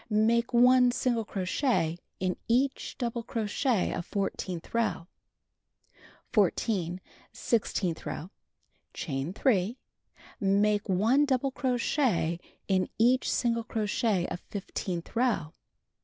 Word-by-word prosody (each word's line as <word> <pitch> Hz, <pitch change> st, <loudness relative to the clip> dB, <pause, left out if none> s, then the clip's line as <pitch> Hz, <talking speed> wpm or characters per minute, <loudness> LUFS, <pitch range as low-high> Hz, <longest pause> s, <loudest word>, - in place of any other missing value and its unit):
Make 230 Hz, +2 st, +2 dB
1 250 Hz, +1 st, +6 dB
single 240 Hz, -3 st, 0 dB
crochet 185 Hz, -, 0 dB, 0.2 s
in 185 Hz, -1 st, 0 dB
each 260 Hz, +4 st, 0 dB
double 235 Hz, -2 st, -2 dB
crochet 225 Hz, 0 st, 0 dB
of 175 Hz, -, -3 dB
fourteenth 185 Hz, -3 st, -4 dB
row. 225 Hz, -7 st, 0 dB, 1.3 s
14. 185 Hz, -3 st, +1 dB, 0.3 s
Sixteenth 195 Hz, -6 st, -1 dB
row: 175 Hz, +5 st, -5 dB, 0.6 s
Chain 140 Hz, +1 st, -3 dB
3. 215 Hz, 0 st, +1 dB, 0.6 s
Make 205 Hz, +1 st, +2 dB
1 225 Hz, +10 st, +3 dB
double 270 Hz, -1 st, +1 dB
crochet 245 Hz, -, 0 dB, 0.3 s
in 190 Hz, -1 st, +1 dB
each 250 Hz, +3 st, +3 dB
single 230 Hz, -1 st, +1 dB
crochet 215 Hz, -3 st, 0 dB
of -, -, -4 dB
fifteenth 185 Hz, -3 st, -5 dB
row. 225 Hz, -11 st, +1 dB
215 Hz, 100 wpm, -29 LUFS, 185-245 Hz, 1.3 s, 1